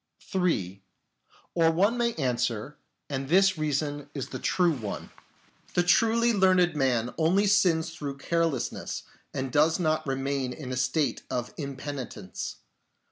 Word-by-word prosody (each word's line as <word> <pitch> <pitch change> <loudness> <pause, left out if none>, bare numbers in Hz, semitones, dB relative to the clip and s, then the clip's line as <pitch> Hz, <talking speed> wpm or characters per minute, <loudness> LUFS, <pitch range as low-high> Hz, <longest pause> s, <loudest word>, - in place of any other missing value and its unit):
(3) 105 - -1 0.7
Or 165 -1 +4
one 195 +8 +3
may 235 -1 0
answer, 125 -2 -1 0.3
and 135 -1 -4
this 195 +3 +5
reason 145 -2 -2
is 135 - -4
the 130 - -5
true 175 +5 +2
one: 110 -8 -6 0.3
" - - -30
The 175 - +4
truly 230 +6 +4
learned 185 -4 +4
man 125 -4 +1
only 180 +6 +3
sins 180 -5 +3
through 140 -4 -5
carelessness, 165 -2 -1 0.3
and 135 -1 -3
does 155 +6 +3
not 155 -2 0
remain 135 -1 -1
in 130 -3 -7
a - - -2
state 130 +4 0
of 125 0 -3
impenitence. 135 - -6
150 Hz, 135 wpm, -28 LUFS, 130-175 Hz, 0.7 s, this